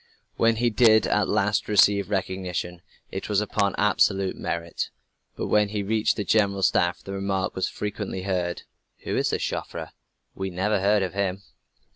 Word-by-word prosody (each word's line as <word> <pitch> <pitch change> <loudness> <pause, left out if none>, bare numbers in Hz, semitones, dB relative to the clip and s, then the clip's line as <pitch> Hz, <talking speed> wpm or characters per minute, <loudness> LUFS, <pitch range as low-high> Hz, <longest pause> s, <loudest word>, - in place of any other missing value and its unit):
When 115 0 +3
he 120 +1 +1
did 110 0 +5
at 105 -1 +1
last 105 +1 +1
receive 100 -1 +4
recognition 90 -3 -3 0.3
it 95 - -5
was 105 -2 +2
upon 100 -2 0
absolute 100 -2 +2
merit. 85 0 -3 0.5
But - - -3
when 105 -1 +2
he 105 -1 -2
reached 110 +2 +1
the 105 - -2
General 100 -2 +2
Staff, 90 -1 +2
the 95 - -7
remark 95 -1 -1
was 95 - -1
frequently 105 -2 -4
heard: 90 -2 -2 0.4
"Who - - -2
is - - +1
this - - -1
Joffre? - - -4 0.4
We 95 0 -4
never 95 +3 0
heard 100 +1 +3
of 95 - -3
him." 100 -1 -2
100 Hz, 165 wpm, -25 LUFS, 95-105 Hz, 0.5 s, did